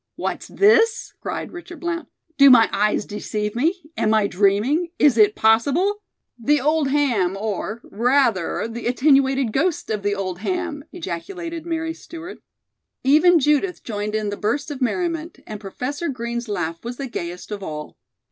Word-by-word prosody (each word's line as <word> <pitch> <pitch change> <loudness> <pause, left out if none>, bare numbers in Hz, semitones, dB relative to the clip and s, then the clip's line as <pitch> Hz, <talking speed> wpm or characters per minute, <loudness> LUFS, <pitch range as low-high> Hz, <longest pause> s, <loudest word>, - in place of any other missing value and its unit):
"What's - - -4
this?" 450 +3 +3
cried - - -4
Richard 345 -1 -10
Blount. 340 -1 -3 0.3
"Do 275 0 +9
my 235 -3 +7
eyes 210 +1 +1
deceive 210 0 -4
me? 335 +9 0
Am 220 -5 +2
I 215 -2 +3
dreaming? 210 - +2
Is 290 -5 +5
it 215 -2 +5
possible 285 - +2 0.2
" - - -44
"The 295 0 +5
old 300 +2 +1
ham, 235 -11 +1
or, 215 +2 -3
rather, 235 -5 +1
the 230 +1 -5
attenuated 270 -2 +3
ghost 320 -3 0
of 210 -2 -1
the 205 0 0
old 185 -3 -4
ham!" 335 - -3
ejaculated 335 - -6
Mary 325 -1 -2
Stewart. 340 +3 -10 0.6
Even 315 +6 +6
Judith 300 +5 +1
joined 210 -1 -3
in 215 -1 -1
the 205 - -4
burst 285 +8 -1
of 280 -2 -6
merriment, 330 +5 -1
and 215 -1 -7
Professor 275 - -4
Green's 235 -2 -4
laugh 165 -4 -3
was 240 +1 -6
the 275 - -4
gayest 180 -6 -6
of 205 -1 -4
all. 150 -4 -6
255 Hz, 160 wpm, -22 LUFS, 210-325 Hz, 0.6 s, Do